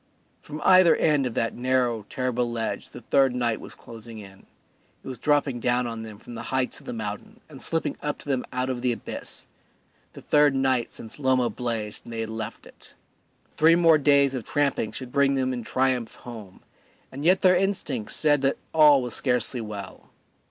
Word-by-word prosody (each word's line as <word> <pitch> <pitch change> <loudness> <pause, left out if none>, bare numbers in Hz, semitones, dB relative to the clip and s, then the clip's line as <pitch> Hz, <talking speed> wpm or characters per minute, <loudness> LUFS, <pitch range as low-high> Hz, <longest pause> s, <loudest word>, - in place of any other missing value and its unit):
From 150 +1 -8
either 185 -2 +6
end 145 -4 +2
of 120 - -6
that 115 - 0
narrow, 120 -4 0
terrible 125 -2 -1
ledge 115 -1 -3
the - - -11
third 135 -2 +2
night 120 -3 -1
was - - -8
closing 115 0 -11
in; 95 -2 -13 0.6
it - - -12
was 130 -3 -6
dropping 145 -3 +1
down 125 +1 +1
on 115 -1 -5
them 110 -2 -9
from 120 - -12
the 115 - -6
heights 130 -1 -1
of - - -17
the - - -3
mountain 105 -3 -6
and 140 -4 -12
slipping 165 -1 -1
up 150 0 -2
to - - -12
them 130 -3 0
out 125 0 -1
of 130 -2 -3
the 125 0 +1
abyss, 115 - -7 0.7
the - - -11
third 150 -2 +3
night 130 -3 +1
since 110 +5 -9
Loma 130 -4 +2
blazed 110 -2 -4
and 115 - -8
they 115 - -3
had 110 0 -4
left 110 0 -6
it. - - -13 0.6
Three 165 +2 +6
more 165 -3 +5
days 140 -1 +4
of 130 -3 -4
tramping 140 -4 0
should 130 -2 -7
bring 140 0 +3
them 130 -1 0
in 120 -2 -4
triumph 130 -1 0
home, 110 -6 -11 0.5
and 135 +2 -7
yet 185 +3 +4
their 185 -1 +5
instincts 180 - -1
said 145 -2 +3
that 135 0 +1 0.2
all 150 -4 +6
was 125 - -3
scarcely 125 -1 +1
well. 105 -3 -8
125 Hz, 195 wpm, -25 LUFS, 115-140 Hz, 0.7 s, either